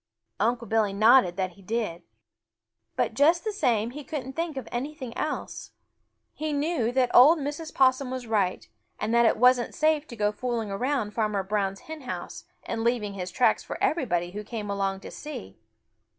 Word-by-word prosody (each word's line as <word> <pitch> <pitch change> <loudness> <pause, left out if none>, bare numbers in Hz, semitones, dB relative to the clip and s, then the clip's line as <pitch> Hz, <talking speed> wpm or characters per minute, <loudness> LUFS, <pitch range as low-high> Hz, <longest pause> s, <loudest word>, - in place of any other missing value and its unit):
Unc' 235 +3 0
Billy 215 -2 +1
nodded 215 -3 +5
that 185 -1 -1
he 195 - -19
did. 205 -4 -3 0.9
But - - 0
just 315 +8 +4
the 435 - -1
same 235 - +1
he 295 +3 -8
couldn't 270 -3 -5
think 330 -2 -3
of 260 - -5
anything 260 -1 -5
else. 305 - -4 0.6
He 310 0 -3
knew 290 -5 0
that 255 -1 +1
old 295 +7 +8
Mrs. 295 +2 -5
Possum 260 0 +3
was 255 -1 -5
right, 205 -5 0 0.3
and 215 +2 -1
that 235 0 +5
it - - +2
wasn't 250 0 +4
safe 310 -1 +2
to 235 - -9
go 210 -1 +1
fooling 225 -1 -3
around 245 +1 -1
Farmer 210 -3 -1
Brown's 195 -1 -1
hen 315 -1 -8
house 255 - -6 0.2
and 225 -1 -3
leaving 230 -4 0
his 185 -2 -5
tracks 240 +7 +2
for - - -6
everybody 175 - 0
who 210 +2 -6
came 210 -2 -5
along 195 -1 -1
to - - -9
see. 105 - -8
235 Hz, 180 wpm, -27 LUFS, 205-275 Hz, 0.9 s, old